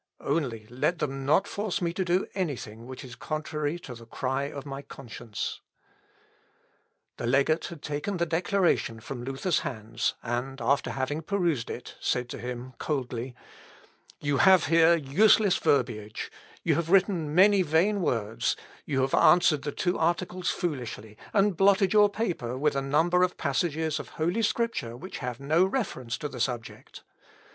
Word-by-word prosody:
Only 130 -8 -1
let 130 +8 0
them 135 -3 -3
not 185 +7 +4
force 205 -2 -2
me 170 -2 -1
to 190 - -1
do 180 +1 +1
anything 120 - -4
which 130 +2 -8
is 125 -2 -10
contrary 155 +1 -3
to 130 - -8
the 115 -1 -12
cry 130 +3 -2
of 140 -1 -7
my 135 -1 -6
conscience." 120 -5 -6 1.6
The 115 - -3
legate 140 +6 +2
had 165 -4 -10
taken 150 +7 -3
the 170 - +1
declaration 170 - +1
from 120 +2 -7
Luther's 135 +7 0
hands, 115 -1 -3
and 125 +3 -3
after 135 +5 +1
having 140 +4 -2
perused 170 - 0
it, 125 - -7
said 125 0 -1
to - - -6
him 125 +2 -6
coldly, 125 -4 -3 0.8
"You 145 -1 0
have 190 -3 +6
here 165 +1 +5
useless 190 +7 +4
verbiage, 115 -5 0 0.3
you 165 - +3
have 165 +2 -1
written 180 -5 +2
many 195 +2 +6
vain 180 +5 +2
words; 115 -5 0 0.3
you 135 -3 0
have 135 +1 0
answered 170 -4 +5
the 145 - -3
two 175 +4 -1
articles 175 +2 0
foolishly, 120 -9 -4 0.2
and 200 -2 +3
blotted 195 +2 +4
your 210 -1 +6
paper 175 - -2
with 150 +1 +1
a 135 - +1
number 160 +6 +2
of 180 0 +1
passages 155 +1 0
of - - -8
holy 175 +8 -1
Scripture 220 - -1
which 185 +8 -8
have 125 0 -4
no 155 +6 +3
reference 190 - -2
to 150 - -4
the 130 -3 -8
subject." 120 -1 -4
150 Hz, 160 wpm, -28 LUFS, 125-175 Hz, 1.6 s, have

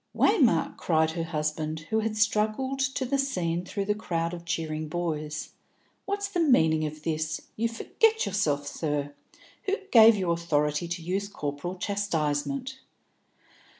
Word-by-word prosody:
"Waymark," 200 - +3
cried 160 -1 +2
her 165 0 -3
husband, 155 -1 -2
who 220 - +3
had 215 0 -2
struggled 220 +5 +1
to 265 0 0
the 275 +2 0
scene 180 -11 -1
through 200 +2 -3
the 210 - +2
crowd 170 -5 -2
of 170 -1 -7
cheering 155 -2 -2
boys, 155 -2 -3 0.5
"what's 405 0 -1
the 390 -3 -2
meaning 160 - +4
of 155 0 -9
this? 155 0 -1 0.2
You 230 +2 0
forget 445 - +1
yourself, 150 -8 0
sir. 145 -1 -2 0.5
Who 395 - +2 0.2
gave 225 0 +9
you 185 -4 0
authority 150 -1 0
to 170 0 -4
use 195 +4 -1
corporal 150 -1 -4
chastisement?" 200 - -2
175 Hz, 145 wpm, -27 LUFS, 155-220 Hz, 0.5 s, gave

